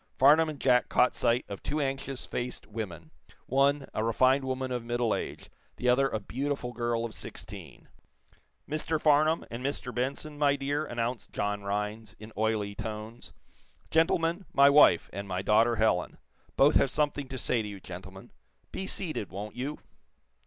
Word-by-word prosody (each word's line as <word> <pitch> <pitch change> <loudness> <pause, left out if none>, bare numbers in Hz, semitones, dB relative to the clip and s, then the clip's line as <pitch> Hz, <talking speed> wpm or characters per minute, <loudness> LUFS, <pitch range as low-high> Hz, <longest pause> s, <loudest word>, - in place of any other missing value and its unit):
Farnum 155 +4 +6
and 150 -3 -7
Jack 125 -2 +3
caught 125 - +3
sight 120 0 +1
of 100 - -7
two 150 - -2
anxious 135 -1 -3
faced 125 +1 -4
women 90 -8 -7 0.3
one, 140 +2 +2
a 110 - -1
refined 130 +4 +3
woman 130 0 -2
of 125 -2 -2
middle 120 -1 0
age, - - -5 0.2
the 125 - -3
other 135 +2 +4
a 110 - -2
beautiful 130 +3 -3
girl 120 -1 -1
of 115 - -6
sixteen. - - -8 0.8
"Mr. 155 +1 -1
Farnum, 155 +2 +3
and 120 +2 -5
Mr. 130 -2 -3
Benson, 140 +4 -3
my 140 -1 +4
dear," 145 +2 -2
announced 120 0 -3
John 105 0 -1
Rhinds, 105 +2 -3
in 110 +1 -11
oily 110 -1 0
tones. 110 +2 -7 0.6
"Gentlemen, 165 +3 +2
my 140 +1 +7
wife, 140 - +6
and 100 0 -5
my 95 0 -3
daughter, 115 +3 +4
Helen. 110 -6 +1 0.4
Both 145 +3 +6
have 135 - +3
something 145 -1 -1
to 130 0 -6
say 120 -1 0
to 105 - -5
you, 100 -1 -7
gentlemen. 95 +1 -10 0.4
Be 190 - -4
seated, 155 - -3
won't 100 +2 -7
you?" 135 +5 -4
125 Hz, 165 wpm, -29 LUFS, 110-140 Hz, 0.8 s, my